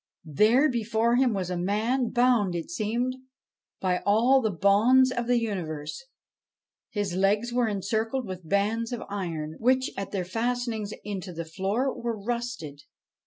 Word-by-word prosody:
There, 215 - +4
before 235 -1 +1
him, 255 -1 +3
was 185 -3 -2
a 180 - -1
man, 225 +7 0
bound, 240 -7 +2
it 170 -1 -4
seemed, 235 +7 -1 0.6
by 180 -1 0
all 240 +6 +4
the 220 - +1
bonds 210 +8 +4
of 240 -2 -2
the 245 0 +3
universe. 165 - -4 0.8
His 205 -5 -2
legs 205 +6 +1
were 245 -1 +2
encircled 220 +5 -1
with 185 -4 -8
bands 220 +4 +1
of 240 - -4
iron, 165 -6 -4
which, 260 +2 +2
at 195 0 -4
their 185 -3 -3
fastenings 225 +1 -2
into 195 -3 -5
the 170 -1 -5
floor, 200 +10 -1
were 235 -2 -4
rusted. 235 -10 -4
215 Hz, 150 wpm, -27 LUFS, 190-240 Hz, 0.8 s, There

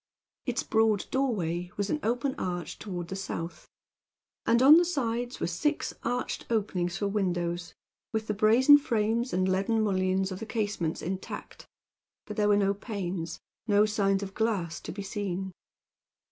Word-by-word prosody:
Its - - 0
broad 220 -2 +2
doorway 180 -10 0
was 205 -1 -1
an 305 - 0
open 245 +4 0
arch 175 -2 -4
toward 175 -4 -5
the 190 - -4
south, 175 -3 -5 0.8
and 230 +1 +5
on 295 +4 +10
the 345 - +6
sides 245 -7 -2
were - - 0
six 190 - -1
arched 245 +1 -2
openings 190 -6 0
for 205 - 0
windows, 175 -4 -1 0.4
with 220 0 -1
the 215 - -1
brazen 235 +8 +6
frames 230 -1 0
and 185 +1 +1
leaden 195 +4 +1
mullions 190 -2 +1
of 185 - -5
the 225 - -5
casements 205 -8 -2
intact; 185 +3 -6 0.6
but 210 - -6
there 210 0 +2
were 205 - +5
no 200 -1 +3
panes 190 -5 -4 0.3
no 205 0 +5
signs 200 -2 +1
of 195 -1 -6
glass 200 -8 -1
to - - -7
be 200 +2 -6
seen. 195 -2 -3
205 Hz, 160 wpm, -29 LUFS, 185-225 Hz, 0.8 s, on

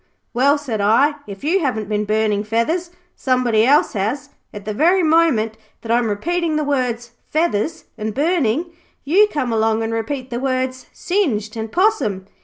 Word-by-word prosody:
"Well," 275 +4 +3
said 245 -8 -3
I, 230 +9 +4
"if 200 -1 -9
you 340 +6 +2
haven't 245 - -2
been 210 0 -1
burning 215 -1 +1
feathers, 230 - -1 0.3
somebody 245 -4 +2
else 285 +2 +4
has." 240 +9 -2 0.2
At 205 -1 -9
the 215 - -3
very 350 - +3
moment 305 -10 +2 0.2
that 225 - -5
I'm 235 -1 +2
repeating 330 +10 -1
the 305 - 0
words 250 -5 -1 0.2
"feathers" 320 -1 0 0.2
and 215 +1 -2
"burning" 315 - 0 0.3
you 380 +9 +4
come 255 -6 -1
along 220 0 +1
and 225 0 -2
repeat 255 +3 -4
the 240 - -2
words 255 -1 -2
"singed" 240 - -1
and 220 -1 -5
"possum". 350 - +1
250 Hz, 165 wpm, -19 LUFS, 220-305 Hz, 0.3 s, I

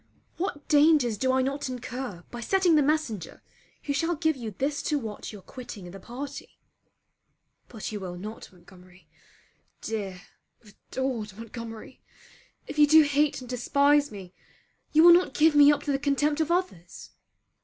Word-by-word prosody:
What 330 -5 -4
dangers 295 -6 +4
do 260 +4 0
I 260 0 +2
not 275 +1 -3
incur 245 -6 -6
by 240 - -7
setting 370 +6 +2
the 305 - +5
messenger 275 - -2 0.4
who 285 - -2
shall 330 +4 0
give 315 0 +1
you 235 -4 -6
this 275 +8 -2
to 300 - 0
watch 220 -6 -6
your 205 -3 -12
quitting 205 -6 -9
the 195 - -10
party? 275 +7 -8 1.1
But 220 -3 -7
you 210 - -4
will 180 -2 -7
not, 210 +5 -9
Montgomery, 180 0 -19 0.7
dear 195 -4 -5 0.4
adored 220 -1 -5
Montgomery, 230 +1 -9 0.6
if 300 - -6
you 295 - +7
do 315 +1 +7
hate 290 -1 +1
and 250 - -10
despise 280 +4 +2
me, 190 -3 -10 0.6
you 315 +1 +5
will 345 0 +10
not 360 +1 +2
give 315 +1 +4
me 290 0 +7
up 290 0 -1
to 290 - -1
the 275 - 0
contempt 290 +2 +1
of 315 - -1
others! 340 - -3
260 Hz, 160 wpm, -27 LUFS, 215-295 Hz, 1.1 s, will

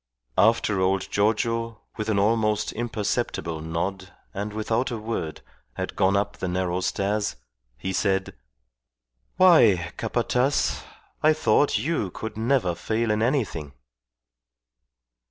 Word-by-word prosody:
After 110 -2 +3
old 95 0 0
Giorgio, 115 +2 0
with 110 0 -3
an 105 - +2
almost 105 +1 +2
imperceptible 105 -7 -2
nod 90 +4 -3 0.2
and 105 0 -4
without 110 +4 -1
a 120 - -3
word, 110 -8 -4 0.3
had - - -4
gone 95 +1 +3
up 100 0 -1
the 95 - -3
narrow 90 0 -1
stairs, 100 -2 -1 0.4
he 95 +9 -4
said 95 0 0 1.0
"Why, 110 - +5
Capataz! 130 +3 0 0.4
I 155 +1 +5
thought 145 -1 +3
you 145 - -1
could 110 +4 -6
never 110 -5 +1
fail 110 +6 -1
in 105 0 +1
anything." 110 - -1
105 Hz, 120 wpm, -25 LUFS, 95-115 Hz, 1.0 s, Why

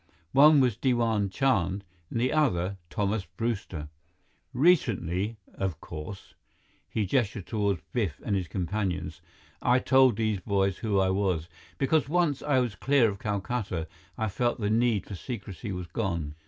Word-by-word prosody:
One 150 +2 +7
was 125 -5 +2
Diwan 115 -6 +1
Chand; 100 -5 +1 0.3
the 120 +2 0
other, 100 - +1
Thomas 105 -2 -1
Brewster. 95 -6 -4 0.6
Recently, 115 - +2 0.2
of 95 -6 -3
course" 80 0 -8 0.6
he 110 - -1
gestured 105 -3 0
toward 100 -3 -1
Biff 100 - -1
and 105 - +1
his 95 -3 -1
companions 95 0 -3 0.4
"I 125 +1 +4
told 130 -2 +5
these 110 -2 0
boys 95 0 0
who 105 -3 0
I 95 -1 +3
was, 95 -4 0 0.3
because 140 +2 +2
once 165 -4 +1
I 145 -3 +1
was 125 -4 +1
clear 125 +2 +3
of 100 - -9
Calcutta, 100 -4 -2 0.3
I 110 - 0
felt 120 +5 0
the 105 -1 0
need 115 -3 +2
for - - -8
secrecy 100 0 -6
was 90 -1 -4
gone. 85 -6 -2
105 Hz, 145 wpm, -28 LUFS, 95-120 Hz, 0.6 s, One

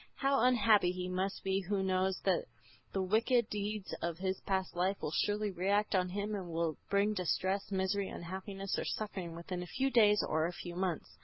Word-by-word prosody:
How 275 0 +2
unhappy 220 -6 +5
he 180 0 -4
must 190 +2 -2
be 195 0 +1
who 195 +1 -1
knows 190 0 +1
that - - +1 0.5
the 195 - 0
wicked 230 +4 +2
deeds 205 -1 -3
of 170 -1 -2
his 190 +1 -2
past 190 -2 0
life 185 +3 +1
will - - -3
surely 205 +4 0
react 200 +4 +1
on 180 -1 +2
him 205 +3 -3
and 190 -3 -3
will 165 -1 -1
bring 200 +2 +3
distress, 190 +1 -1
misery, 190 +1 0
unhappiness 190 +2 -4
or - - -1
suffering 190 -6 -4
within 175 +2 -5
a 180 - -6
few 270 +8 0
days 210 -4 +5
or 160 +1 +1
a 175 - -5
few 175 0 -7
months. 180 -3 -3
190 Hz, 190 wpm, -34 LUFS, 180-205 Hz, 0.5 s, unhappy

